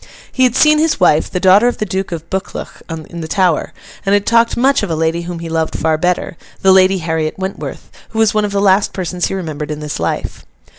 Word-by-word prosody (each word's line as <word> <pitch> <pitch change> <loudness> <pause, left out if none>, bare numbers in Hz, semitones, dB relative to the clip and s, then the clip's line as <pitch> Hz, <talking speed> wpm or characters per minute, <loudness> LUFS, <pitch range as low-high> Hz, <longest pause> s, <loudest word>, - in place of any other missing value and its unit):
He 260 - +2
had 250 -1 +1
seen 305 0 +5
his 315 -1 +1
wife, 160 -4 +3
the 180 - -2
daughter 195 +5 +5
of 245 - 0
the 215 - -2
Duke 190 -1 -3
of 165 -1 -6
Buccleuch, 190 +1 -5
in 165 +1 -7
the 160 - -5
Tower, 180 -1 +1 0.3
and 195 - +1
had 205 0 +2
talked 230 0 +2
much 270 +3 +3
of 205 - -3
a 165 - -1
lady 165 +2 0
whom 175 0 -6
he 165 0 -6
loved 160 -1 -2
far 160 0 +1
better—the 180 +3 -1
Lady 190 0 +5
Harriet 160 -2 -2
Wentworth—who 190 +3 -7
was 220 -2 +3
one 215 0 +1
of 205 - -2
the 200 - 0
last 195 0 +3
persons 180 -1 -2
he - - -4
remembered 155 -5 -5
in 150 -1 -4
this 150 - -5
life. 85 - -3
185 Hz, 230 wpm, -16 LUFS, 160-205 Hz, 0.3 s, seen